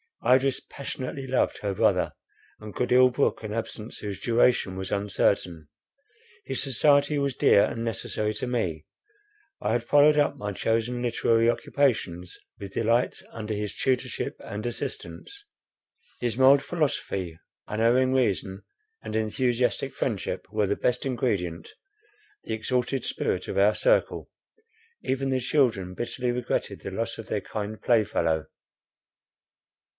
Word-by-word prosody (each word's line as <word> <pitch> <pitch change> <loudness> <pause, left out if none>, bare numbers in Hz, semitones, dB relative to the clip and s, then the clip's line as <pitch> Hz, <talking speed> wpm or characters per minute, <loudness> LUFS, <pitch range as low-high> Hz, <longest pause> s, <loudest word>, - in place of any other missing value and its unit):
Idris 130 +1 +4
passionately 135 0 -6
loved 130 0 +1
her 100 -1 -2
brother, - - +2 0.5
and 110 -1 -10
could 125 - -1
ill 130 +1 +7
brook 130 +3 0
an 105 -1 -4
absence 115 0 -5
whose 100 -2 -5
duration 115 -4 +2
was 95 0 -5
uncertain; 95 -5 0 0.8
his 135 - -3
society 145 +2 +3
was 140 -2 0
dear 100 - +5
and 115 - -4
necessary 110 -1 -2
to 110 - -3
me—I 320 - -5
had 120 - 0
followed 145 +3 +5
up 145 - +2
my 105 0 -4
chosen 115 +4 0
literary 115 -1 +2
occupations 100 -10 0 0.2
with 100 -1 -8
delight 115 +2 +1
under 110 -1 -5
his 105 0 -4
tutorship 130 -1 -1
and 105 +1 -6
assistance; 405 - -6 0.7
his 120 -2 -2
mild 135 +1 +6
philosophy, 100 - -2 0.3
unerring 120 +4 +2
reason, 100 -6 0 0.4
and - - -5
enthusiastic 120 +2 0
friendship - - -3
were 105 -2 +1
the 100 - +1
best 125 0 0
ingredient, 100 -10 -2 0.7
the - - -4
exalted 125 +4 -1
spirit - - -2
of - - -4
our - - +5
circle; - - +1 0.7
even 135 +1 -1
the 130 -1 +1
children 120 -9 +1
bitterly 120 +2 -2
regretted 125 0 -2
the 95 - -6
loss 115 +3 -3
of 115 - -8
their 105 - -1
kind 105 0 -5
playfellow. 85 -9 +2
115 Hz, 130 wpm, -26 LUFS, 105-130 Hz, 0.8 s, ill